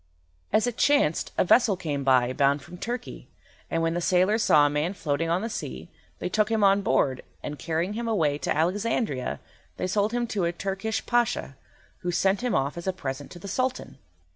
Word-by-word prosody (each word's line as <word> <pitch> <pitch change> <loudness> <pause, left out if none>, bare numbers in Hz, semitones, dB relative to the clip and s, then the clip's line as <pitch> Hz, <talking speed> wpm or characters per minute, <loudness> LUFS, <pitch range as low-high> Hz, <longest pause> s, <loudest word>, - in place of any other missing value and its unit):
As 215 +2 +3
it 245 -1 -3
chanced, 285 - +2
a - - +3
vessel 215 0 +4
came 145 -5 -3
by, 130 -2 +3
bound 140 0 +2
from 180 - -11
Turkey, 240 +1 -5 0.4
and 165 0 0
when 165 0 +1
the 175 - -1
sailors 185 +6 +3
saw 150 -8 +5
a - - +5
man 150 +6 -1
floating 165 -1 -1
on 175 +4 +1
the - - -1
sea, 65 - -6 0.3
they - - -3
took 215 +3 +1
him 220 -2 +1
on 200 0 +5
board, 130 -9 +1 0.2
and, 145 0 -5
carrying 165 +4 -1
him 230 +2 -3
away 155 -10 +1
to - - -1
Alexandria, 185 - 0 0.4
they - - -2
sold 205 +3 +1
him 240 0 0
to 205 -6 -1
a 170 - +1
Turkish 195 +5 -3
Pasha, 240 - 0 0.4
who 180 - -3
sent 190 +4 +1
him 245 -3 0
off 140 +5 0
as 170 - -8
a 190 - +1
present 140 -5 -5
to - - -11
the 175 - -9
Sultan. 255 +6 -2
180 Hz, 205 wpm, -26 LUFS, 150-215 Hz, 0.4 s, saw